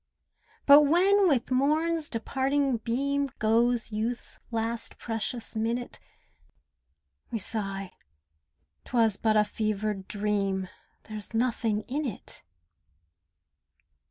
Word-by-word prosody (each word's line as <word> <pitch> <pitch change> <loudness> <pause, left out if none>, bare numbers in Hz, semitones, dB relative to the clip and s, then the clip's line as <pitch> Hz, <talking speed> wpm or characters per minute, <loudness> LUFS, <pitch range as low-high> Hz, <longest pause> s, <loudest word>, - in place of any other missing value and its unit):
But 285 +1 +9
when 375 +7 +4
with 265 -6 +1
morn's 305 +4 +1
departing 265 +3 0
beam 275 +5 -1
Goes 230 +1 +2
youth's 225 +3 -4
last 230 0 -3
precious 225 +1 -4
minute, 230 +3 -2 1.3
We 230 - -2
sigh 195 -3 -4 0.9
"'Twas 225 -5 +2
but 215 -1 +2
a 210 - +6
fevered 210 -2 -2
dream— 200 -2 -1 0.3
There's 215 0 -8
nothing 225 -2 0
in 290 +3 -2
it." 215 - -7
230 Hz, 95 wpm, -28 LUFS, 215-270 Hz, 1.3 s, But